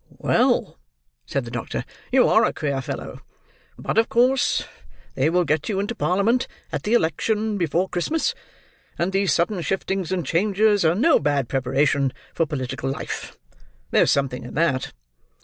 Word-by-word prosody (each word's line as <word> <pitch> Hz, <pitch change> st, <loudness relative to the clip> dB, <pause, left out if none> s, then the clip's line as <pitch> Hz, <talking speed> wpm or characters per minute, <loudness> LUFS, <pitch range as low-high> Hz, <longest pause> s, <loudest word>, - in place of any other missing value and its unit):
"Well," -, -, +1 dB, 0.5 s
said 135 Hz, -, -2 dB
the 115 Hz, -, -8 dB
doctor, 115 Hz, -1 st, -4 dB, 0.3 s
"you -, -, +5 dB
are -, -, +5 dB
a -, -, +1 dB
queer 140 Hz, -3 st, -2 dB
fellow. -, -, -6 dB, 0.6 s
But -, -, 0 dB
of 225 Hz, -, +2 dB
course 255 Hz, +3 st, +2 dB, 0.5 s
they 135 Hz, +4 st, +1 dB
will 180 Hz, +2 st, +2 dB
get 155 Hz, +3 st, 0 dB
you 195 Hz, -3 st, 0 dB
into 205 Hz, +4 st, -2 dB
parliament 220 Hz, +4 st, +1 dB, 0.2 s
at -, -, -2 dB
the 220 Hz, +3 st, +1 dB
election 215 Hz, +4 st, 0 dB
before 170 Hz, +2 st, +1 dB
Christmas, 185 Hz, -, -1 dB, 0.6 s
and 175 Hz, +3 st, 0 dB
these 195 Hz, 0 st, +1 dB
sudden 175 Hz, +2 st, +1 dB
shiftings 190 Hz, 0 st, -2 dB
and 180 Hz, -4 st, -1 dB
changes 205 Hz, +5 st, +2 dB
are 160 Hz, +1 st, +3 dB
no 275 Hz, -, +4 dB
bad 140 Hz, -4 st, 0 dB
preparation 135 Hz, +1 st, +1 dB, 0.2 s
for 165 Hz, -, 0 dB
political 135 Hz, -2 st, -3 dB
life. 135 Hz, -, -5 dB, 0.5 s
There's -, -, +4 dB
something 135 Hz, -3 st, 0 dB
in 120 Hz, -, -9 dB
that. 145 Hz, -4 st, +1 dB
170 Hz, 155 wpm, -23 LUFS, 140-205 Hz, 0.6 s, you